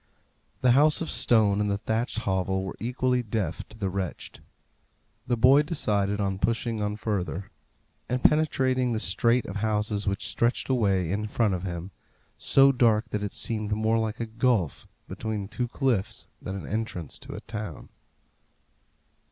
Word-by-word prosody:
The 125 - +5
house 150 +4 +5
of 165 - -2
stone 105 -3 +3
and 105 - 0
the 100 - 0
thatched 115 +3 -2
hovel 95 -1 0
were 95 - -5
equally 125 +1 0
deaf 105 -7 -3
to 110 - -13
the 100 -3 -2
wretched. 95 -1 -5 0.9
The 120 -1 +1
boy 130 +5 +6
decided 105 - 0
on 95 -2 -1
pushing 115 0 -1
on 105 0 -1
further, 100 -3 -3 0.6
and 125 0 -1
penetrating 130 -5 +2
the 110 - -1
strait 115 +5 +2
of - - -5
houses 105 -1 -1
which 100 0 -1
stretched 120 +3 0
away 100 -9 +1
in 105 +2 -1
front 110 -2 +1
of 90 - -2
him, 90 +1 -5 0.5
so 135 0 +5
dark 120 -3 +2
that 105 - -2
it 105 - -3
seemed 110 -2 -1
more 110 +1 +1
like 110 -1 -2
a 115 - -1
gulf 110 - 0 0.2
between 110 -3 -4
two 120 +4 -3
cliffs 110 -6 -1
than 95 +1 -5
the - - -8
entrance 105 -8 -4
to - - -9
a - - -7
town. 105 -6 -7
110 Hz, 160 wpm, -27 LUFS, 100-120 Hz, 0.9 s, boy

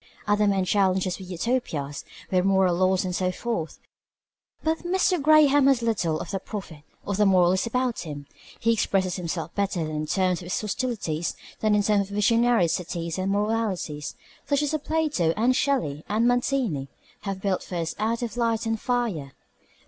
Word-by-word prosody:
Other 210 0 +3
men 195 -2 +2
challenge 190 -1 +2
us 185 0 -3
with 185 -1 -9
Utopias, 170 - -2 0.3
with 185 -1 +3
moral 190 -2 +3
laws 185 +1 +2
and 180 -1 -2
so 185 0 0
forth. 185 -6 -3 0.9
But 320 +1 +1
Mr. 360 -1 +1
Graham 290 -2 +6
has 265 -4 +3
little 175 -9 0
of - - -6
the 195 - -2
prophet 185 -7 -7 0.2
or 200 - -2
the 210 +2 +2
moralist 185 +2 +3
about 250 0 -1
him. 145 -3 -6 0.3
He 230 +1 +3
expresses 190 -4 0
himself 165 -2 -4
better 200 -3 -1
in 155 -1 -3
terms 185 -1 +1
of 180 - -10
his 180 - -1
hostilities 205 -8 -2 0.2
than 215 -1 +2
in 205 - +2
terms 200 -1 +2
of 200 - -6
visionary 230 -2 +3
cities 170 0 -3
and 190 +1 0
moralities 205 -8 -1 0.3
such 285 +1 +2
as 295 - -1
Plato 295 - +1
and 245 +4 +3
Shelley 160 - 0
and 220 +3 +2
Mazzini 245 - 0 0.3
have 195 -2 -4
built 195 -2 0
for 180 - -7
us 165 -1 -2
out 230 +3 0
of 235 - -4
light 230 -2 0
and 225 -1 -1
fire. 225 - -2
200 Hz, 175 wpm, -25 LUFS, 175-235 Hz, 0.9 s, Graham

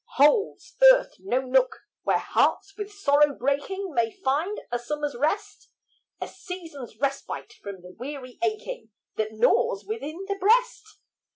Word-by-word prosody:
Holds 295 +10 +3
earth - - +1
no 260 -9 0
nook, 450 - +2 0.2
where - - +2
hearts 395 0 +1
with 415 0 -6
sorrow 295 -7 +3
breaking, 295 +8 -1
May 235 -3 +2
find 300 - -1
a 240 - 0
summer's 295 +2 -3
rest? 310 - -2 0.5
A - - -4
season's 335 - -9
respite 275 0 -3
from 195 -3 -8
the 180 - -11
weary 255 +3 -8
aching 430 - -3 0.3
That 215 0 -1
gnaws 200 -2 +2
within 285 - -5
the 400 -1 -2
breast? 440 +1 +2
295 Hz, 135 wpm, -26 LUFS, 255-400 Hz, 0.5 s, Holds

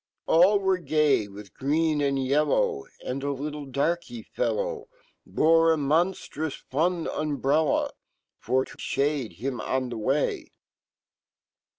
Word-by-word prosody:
All 180 +5 +5
were 190 -2 +1
gay 150 - +2
wifh 100 -2 -12
green 155 +2 +1
and 140 -1 +1
yellow 410 - +1 0.2
And 130 +2 -3
a 140 +1 -1
little 145 +1 -5
darky 170 - -2
fellow - - -2 0.4
Bre 165 +1 +4
amonftrous 160 0 -1
Inn 165 +3 +1
umbrella, 150 0 0 0.5
Forto 130 +1 -1
fhade 140 - -1
him 125 +8 -4
on 130 -1 -2
fhe 115 - -4
way. 135 +6 -1
150 Hz, 110 wpm, -26 LUFS, 135-170 Hz, 0.5 s, All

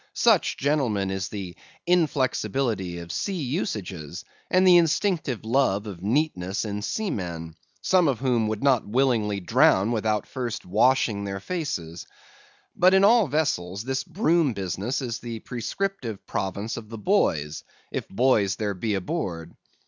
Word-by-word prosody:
Such, 225 -6 +3
gentlemen, 125 -9 0
is 95 -1 -3
the 95 -4 -6 0.3
inflexibility 130 - 0
of 85 0 -7
sea 195 - -2
usages 95 - -4 0.2
and 185 +1 +4
the 180 -1 +8
instinctive 165 - +1
love 110 -4 +1
of 95 -5 -8
neatness 105 - 0
in 105 -1 -3
seamen; 90 - -4 0.3
some 185 -3 +4
of 135 -4 +1
whom 120 -3 +1
would 110 +2 -3
not 130 -5 +4
willingly 110 -4 +1
drown 115 - +3
without 110 -2 0
first 120 -3 -5
washing 110 +1 +2
their 100 -1 -4
faces. 95 - -4 0.7
But 185 +2 +5
in 190 - +5
all 220 0 +6
vessels 105 - -1
this 130 +1 -2
broom 170 - +1
business 100 - -3
is 115 -2 -3
the 115 -1 -6
prescriptive 125 - -4
province 100 +3 -3
of 110 -2 -8
the 115 - -7
boys, 80 - 0 0.3
if - - -4
boys 110 -3 +2
there 105 -2 -2
be 105 +3 -2
aboard. 90 - -4
115 Hz, 140 wpm, -25 LUFS, 95-145 Hz, 0.7 s, the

